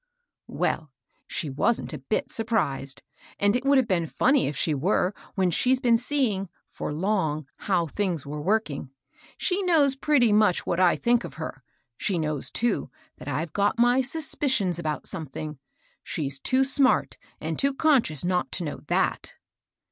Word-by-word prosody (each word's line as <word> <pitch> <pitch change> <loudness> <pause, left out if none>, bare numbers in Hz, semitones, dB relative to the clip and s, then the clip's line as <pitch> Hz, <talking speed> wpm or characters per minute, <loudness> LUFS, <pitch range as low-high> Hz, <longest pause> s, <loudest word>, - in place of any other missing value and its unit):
" - - -64 0.2
Well, 155 - 0 0.4
she 150 - -3
wasn't 185 - 0
a - - -5
bit 215 - -2
surprised; 140 - -1 0.4
and 205 +2 +3
it 250 - 0
would 275 0 +4
have 260 -3 +3
been 170 -4 +1
funny 270 - +2
if 145 - -4
she 155 - +1
were, 180 +6 +1 0.2
when 185 -3 +2
she's 255 +9 +2
been 240 -3 +4
see 260 0 +1
ing, 195 -1 -4 0.2
for - - -6
long, 155 -3 -1
how 180 -5 0
things 175 -2 -2
were 150 +1 -5
working. 175 -7 -1 0.5
She 380 +1 0
knows 310 -7 +3
pretty 270 -6 +3
much 210 -4 +3
what 175 - -1
I 180 -2 +5
think 240 0 +2
of - - -8
her; 160 -4 -6 0.4
she 195 -4 -1
knows, 155 -3 -2
too, 235 -2 -1 0.3
that - - -11
I've 150 +3 -3
got 205 +2 +1
my 245 +2 +4
suspicions 260 - 0
about 155 -3 -3
some 160 - -4
thing. 150 +1 -7 0.4
She's 140 -3 -4
too 260 - +2
smart 270 -1 +2 0.2
and - - -4
too 275 0 +3
conscious 270 - +2
not 180 0 0
to 180 - -1
know 150 - -4
ihat. - - -1
195 Hz, 170 wpm, -26 LUFS, 155-250 Hz, 0.5 s, I